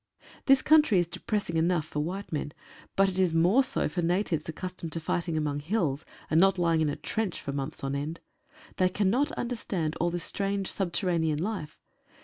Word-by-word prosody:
This 270 -1 +6
country 305 -9 +5
is 175 - +3
depressing 170 0 -3
enough 165 -1 +2
for 150 - -4
white 185 +6 -4
men, 145 -1 -3 0.4
but 195 0 +4
it 190 -1 -2
is 180 -3 +2
more 180 +11 +5
so - - 0
for 165 +4 -2
natives 170 -2 0
accustomed 180 0 -6
to 165 - -1
fighting 165 0 -1
among 145 -2 -1
hills, 155 -4 -1 0.2
and 160 - +3
not 195 0 +4
lying 165 -2 +2
in 155 - +2
a - - -2
trench 215 -5 -3
for 140 - -5
months 140 +1 -5
on 135 0 -1
end. 150 +4 -3 0.6
They 185 0 +3
cannot 215 - +1
understand 190 -10 -2
all 175 - +1
this 175 0 -3
strange 195 -1 -1
subterranean 175 -4 0
life. 170 -3 -4
175 Hz, 185 wpm, -28 LUFS, 155-195 Hz, 0.6 s, This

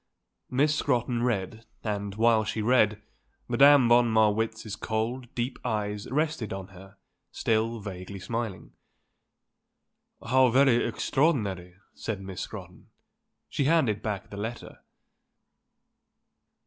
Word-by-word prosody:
Miss 145 +4 +2
Scrotton 125 -4 0
read, 110 -2 -2 0.2
and, 100 -2 -3
while 115 0 +3
she 110 0 -3
read, 105 -3 +3 0.4
Madame 140 -2 +6
von 120 0 +5
Marwitz's 110 0 +1
cold, 115 +4 -3
deep 125 +2 -3
eyes 105 -3 -3
rested 150 -5 -1
on 95 0 -6
her, 95 +1 -15 0.3
still 115 +1 0
vaguely 100 -1 -7
smiling. 110 -3 -5 1.6
"How 130 +1 +5
very 130 -1 +4
extraordinary," 100 - 0 0.2
said 110 -4 -4
Miss 95 -2 -7
Scrotton. - - -9 0.6
She 140 - -1
handed 135 -10 +2
back 105 -3 -4
the 100 - -7
letter. 110 +3 -6
110 Hz, 110 wpm, -27 LUFS, 105-125 Hz, 1.6 s, Madame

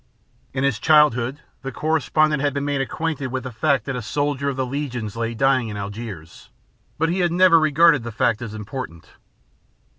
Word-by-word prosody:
'" - - -38
In 130 - 0
his 135 -6 +1
childhood, 150 -3 +3 0.2
the 135 - -5
correspondent 155 +1 +1
had 145 -1 0
been 140 0 -2
made 145 -1 0
acquainted 150 0 -3
with 130 0 -4
the 130 - -6
fact 130 +1 +1
that 135 - -3
a 125 - -3
soldier 140 +3 -1
of 140 - -3
the 130 - 0
Legion 125 -4 -4
lay 115 0 -3
dying 130 0 +2
in 105 - -6
Algiers, 100 -5 -8 0.5
but 165 +1 +1
he 180 +3 -1
had 175 -2 +2
never 175 -1 +6
regarded 155 -1 +4
the 120 +1 -6
fact 110 +1 0
as 110 -2 -6
important. 105 - -7
135 Hz, 190 wpm, -22 LUFS, 115-150 Hz, 0.5 s, never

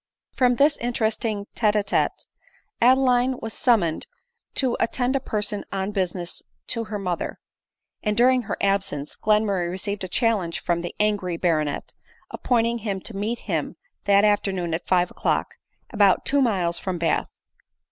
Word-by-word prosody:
From 250 -1 +2
this 290 +3 +4
interesting 220 -3 -1
tete 215 -2 +2
a 210 - +2
tete 200 - -1 0.6
Adeline 255 0 +4
was 225 0 -6
summon 195 -10 +2
ed - - -10 0.5
to 260 -3 +2
attend 250 +3 0
a - - +2
person 210 -4 -1
on 195 +1 -2
business 180 -3 -1 0.3
to 230 -1 -1
her 215 -1 -4
mother 180 -4 -3 0.3
% - - -57
and 210 -1 0
during 255 +1 +5
her 220 - -4
absence, 190 -8 -1
Glenmurray 205 -4 +1
received 195 +2 -3
a - - -3
challenge 195 -4 0
from 170 -1 -1
the 175 - -6
angry 205 -5 0
baronet, 155 -5 -1 0.4
appointing 235 -1 +1
him 200 -3 -3
to 225 - -7
meet 215 +4 -2
him - - -2 0.3
that 200 +1 +5
afternoon 190 -5 0
at 165 - -4
five 180 -1 +2
o'clock, - - -1 0.4
about 200 -4 +3
two 285 0 +3
miles 185 -9 +1
from 185 -2 -3
Bath. 165 -2 0
205 Hz, 155 wpm, -24 LUFS, 180-235 Hz, 0.6 s, during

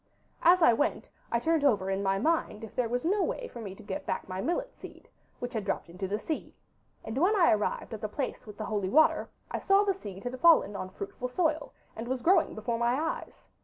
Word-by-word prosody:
As 350 +1 +6
I 240 - +7
went 290 +8 -1 0.2
I 235 - +3
turned 320 +5 +1
over 200 -9 +2
in 195 +1 -1
my 195 0 +1
mind 245 -4 0
if 220 - -8
there 245 -2 0
was 245 +3 -1
no 400 +4 +2
way - - -2
for 235 - -9
me 195 -3 -7
to - - -14
get 200 -2 -5
back - - -2
my 185 0 -4
millet - - -2
seed, - - -12 0.3
which 245 +1 -5
had 220 -3 -2
dropped 195 -3 -3
into 185 +2 -4
the 205 +2 -1
sea, 310 +8 -5 0.5
and 220 +4 -3
when 380 +7 +4
I 355 -5 +5
arrived 215 +2 -1
at 220 - -6
the 215 - -3
place 255 0 -4
with 210 -1 -10
the 215 - -4
holy 205 -3 -1
water 315 +8 +4 0.2
I - - -2
saw 390 +1 +4
the 400 -1 +2
seed 200 - -9
had 250 +1 -5
fallen 315 -11 +5
on 185 - -4
fruitful 200 +6 -6
soil, 310 +3 0 0.2
and 225 +2 -6
was 255 -1 -2
growing 375 +3 +4
before 230 +2 -2
my 240 +3 +2
eyes. 325 +1 -4
240 Hz, 240 wpm, -29 LUFS, 205-325 Hz, 0.5 s, I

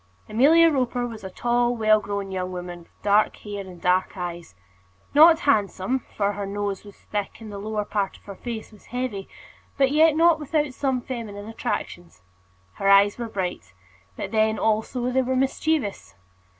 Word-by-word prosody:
Amelia 315 +9 +5
Roper 250 -3 0
was 225 -3 -8
a 190 - -5
tall, 240 +4 +1
well 215 -1 +4
grown 200 -2 -4
young 185 -1 -3
woman, 175 -1 -6
with 170 - -22
dark 210 +1 +3
hair 205 -1 -6
and 185 -2 -11
dark 180 +1 +1
eyes; 175 - -6 0.6
not 320 +3 +7
handsome, 215 -1 +1 0.2
for 200 -1 +2
her 200 -1 -4
nose 200 -1 -3
was 205 -1 -13
thick, 205 0 -5
and 220 -2 -9
the 200 - -6
lower 210 0 -3
part 200 -2 -2
of - - -26
her 200 - -8
face 225 +2 -7
was 210 - -18
heavy, 245 -5 -4 0.5
but 270 -1 +3
yet 310 +1 +5
not 330 0 +4
without 300 -2 -1
some 260 -2 -1
feminine 215 -5 -6
attractions. 175 - -5 0.5
Her 195 - +1
eyes 200 +2 +5
were 235 -1 -4
bright; 180 - -4 0.4
but 195 - -5
then, 220 0 +2
also, 220 +4 0
they 260 +1 +2
were 260 0 -1
mischievous. 270 -3 -1
215 Hz, 175 wpm, -24 LUFS, 195-255 Hz, 0.6 s, not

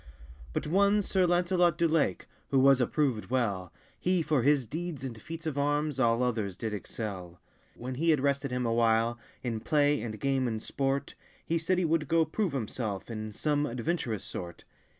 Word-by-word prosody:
But - - -2
one 200 +5 +3
Sir 185 -1 +2
Lancelot 175 -1 +3
du 170 -1 +3
Lake, 155 - +1 0.2
Who 135 - +2
was 135 0 +6
approved 125 -3 0
well, 100 -8 -1 0.3
He 180 -2 +1
for 150 -4 +2
his 140 0 +3
deeds 155 +2 -5
and 115 -5 -6
feats 165 0 -7
of 145 -3 -2
armes 145 0 0
All 115 -1 +3
others 110 -7 -1
did 110 +2 -3
excell. 95 -4 -5 0.4
When 125 +2 -5
he 160 +6 0
had 155 -3 +4
rested 140 0 0
him 125 0 -1
a 115 - +1
while, 115 0 +2 0.2
In 115 -3 -2
play, 145 +2 +2
and 110 -2 -5
game, 135 -2 +1
and 110 -2 -2
sportt, 135 +4 -2 0.3
He 165 0 0
said 180 +3 +1
he 180 - +2
wold 160 -2 +1
goe 165 +1 +3
prove 180 +2 -1
himselfe 110 -4 -3
In 110 -1 -5
some 150 +6 0
adventurous 120 - -2
sort. 85 -2 -7
135 Hz, 185 wpm, -29 LUFS, 115-160 Hz, 0.4 s, was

